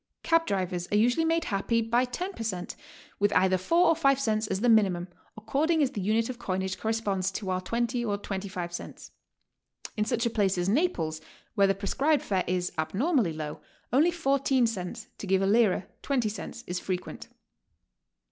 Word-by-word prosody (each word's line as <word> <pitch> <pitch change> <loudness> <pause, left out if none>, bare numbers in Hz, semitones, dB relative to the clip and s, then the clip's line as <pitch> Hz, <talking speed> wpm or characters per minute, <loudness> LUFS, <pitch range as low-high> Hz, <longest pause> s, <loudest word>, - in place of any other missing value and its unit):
Cab 330 0 +3
drivers 180 -2 -2
are 205 - +3
usually 245 +9 +3
made 330 0 +1
happy 225 0 0
by 235 +2 +2
ten 365 +10 -4
per - - -8
cent., 185 -6 -3 0.4
with 205 0 +3
either 190 0 +4
four 335 - +3
or 330 - +4
five 275 -4 +3
cents 220 -4 0
as 190 - -1
the 245 - +2
minimum, 195 -6 +3 0.3
according 300 +8 +1
as 265 - 0
the 205 - -4
unit 220 +4 +1
of 250 -1 -6
coinage 190 -3 -2
corresponds 205 -4 -1
to 190 0 -4
our 185 0 -1
20 240 +4 -1
or 205 -3 -1
25 190 -3 -5
cents. - - -8 0.8
In 215 - +1
such 235 +2 0
a 235 - +1
place 200 -4 +1
as 175 0 0
Naples, 200 - 0 0.3
where 200 -3 +4
the 195 - +2
prescribed 275 +10 +1
fare 190 -2 0
is 180 0 -1
abnormally 225 - +1
low, 155 -1 -6 0.3
only 300 +7 +5
14 275 -6 +2
cents, 220 0 -4
to 200 - -6
give 190 0 +2
a - - +2
lira, 205 -3 +3 0.2
twenty 250 -6 0
cents, 220 +3 -7
is 180 +1 -3
frequent. 185 -1 -5
215 Hz, 185 wpm, -28 LUFS, 190-255 Hz, 0.8 s, only